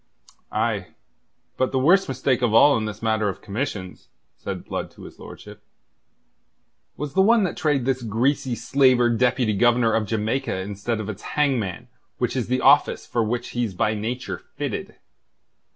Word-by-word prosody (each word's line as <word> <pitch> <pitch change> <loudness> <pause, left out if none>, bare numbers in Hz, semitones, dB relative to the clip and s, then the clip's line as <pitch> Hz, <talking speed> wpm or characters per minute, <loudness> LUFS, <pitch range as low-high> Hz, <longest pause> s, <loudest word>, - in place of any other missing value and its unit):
"Aye - - -2 0.6
but 130 - 0
the 135 - 0
worst 175 +9 +4
mistake 130 -1 0
of 115 -3 +1
all 145 +5 +7
in 110 - -1
this 105 +1 -7
matter 110 -2 +1
of 95 - -7
commissions," 100 -4 -5 0.3
said - - -6
Blood - - -4
to - - -15
his - - -12
lordship, - - -12 1.4
"was 145 -1 -5
the 190 - +4
one 225 +2 +4
that 180 - -2
trade 145 -5 0
this 130 -1 0
greasy 125 +4 0
slaver 130 -2 +3
Deputy 125 -1 +1
Governor 120 +1 +3
of 110 -2 0
Jamaica 110 +1 -1
instead 100 +4 -3
of 110 - -5
its 110 -1 -6 0.2
hangman, 120 -7 0 0.3
which 125 - -1
is 125 -4 -1
the 125 +1 0
office 140 +2 +4
for 115 - 0
which 120 +2 -3
he's 120 -6 -3
by 105 +4 +1
nature 115 +4 -4 0.2
fitted." - - -4
120 Hz, 165 wpm, -23 LUFS, 110-135 Hz, 1.4 s, all